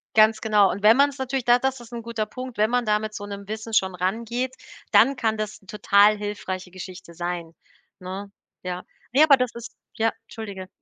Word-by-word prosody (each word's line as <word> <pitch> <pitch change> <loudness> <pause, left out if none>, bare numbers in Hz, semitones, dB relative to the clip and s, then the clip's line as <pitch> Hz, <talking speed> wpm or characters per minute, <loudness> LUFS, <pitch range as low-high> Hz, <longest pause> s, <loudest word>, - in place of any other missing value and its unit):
Ganz 220 0 +5
genau. 210 -3 +4
Und 200 +2 -4
wenn 220 +2 +8
man's 280 +1 +3
natürlich 265 0 -2
da 245 0 +6
das 265 +1 -1
ist 240 -1 -13
'n 235 -1 -6
guter 225 -2 -3
Punkt, 255 +2 -8
wenn 215 +1 +4
man 245 0 +1
da 210 0 +2
mit 215 0 -6
so 205 - -6
'nem 200 -1 -8
Wissen 220 +1 -6
schon 190 -3 +2
rangeht, 230 +7 -2 0.4
dann 275 - +5
kann 220 -3 0
das 215 -1 -4
'ne - - -23
total 205 +1 +4
hilfreiche 200 -3 -5
Geschichte 185 -1 -10
sein, 175 -1 -4 0.4
ne? 190 +2 -7 0.3
Ja. 180 0 -5 0.3
Ne, 280 +5 +6
aber 285 -3 +7
das 250 -1 0
ist 235 0 -9 0.2
ja, 225 -1 +2 0.2
entschuldige. 200 -4 -7
215 Hz, 205 wpm, -24 LUFS, 195-240 Hz, 0.4 s, wenn